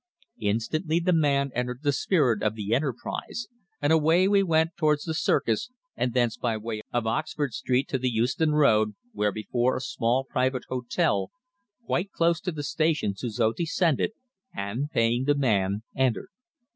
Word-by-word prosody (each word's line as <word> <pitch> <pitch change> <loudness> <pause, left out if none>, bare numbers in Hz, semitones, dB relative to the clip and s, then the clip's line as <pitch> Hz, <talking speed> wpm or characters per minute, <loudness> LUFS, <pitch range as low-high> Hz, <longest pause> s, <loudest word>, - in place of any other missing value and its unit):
Instantly 155 - 0
the 180 +1 +1
man 140 -4 +2
entered 125 0 -2
into 135 - -28
the 145 - +3
spirit 135 - +2
of 110 0 0
the 105 0 -2
enterprise, 140 - -3 0.3
and 145 +2 +2
away 160 +4 +4
we 200 0 +4
went 165 -2 +2
towards 150 -3 +1
the 160 - -3
Circus, 115 - +1 0.3
and 125 -1 -1
thence 120 -3 +2
by 115 -3 -1
way 110 0 -5
of 120 -2 -1
Oxford 120 +3 -1
Street 130 +4 0
to 130 - -1
the 130 +1 0
Euston 125 +7 +1
Road, 110 -8 +3 0.2
where 105 0 0
before 120 +4 0
a - - -3
small 130 0 0
private 130 -1 -1
hotel 120 -6 0 0.6
quite 195 -1 -1
close 170 0 +1
to 180 - -2
the 150 -3 -5
station 155 -8 0
Suzor 110 +1 -1
descended, 170 - +1 0.4
and, 110 +9 -3
paying 120 -3 +1
the 145 +1 +3
man, 105 -6 +1
entered. 130 - 0
130 Hz, 165 wpm, -26 LUFS, 115-155 Hz, 0.6 s, away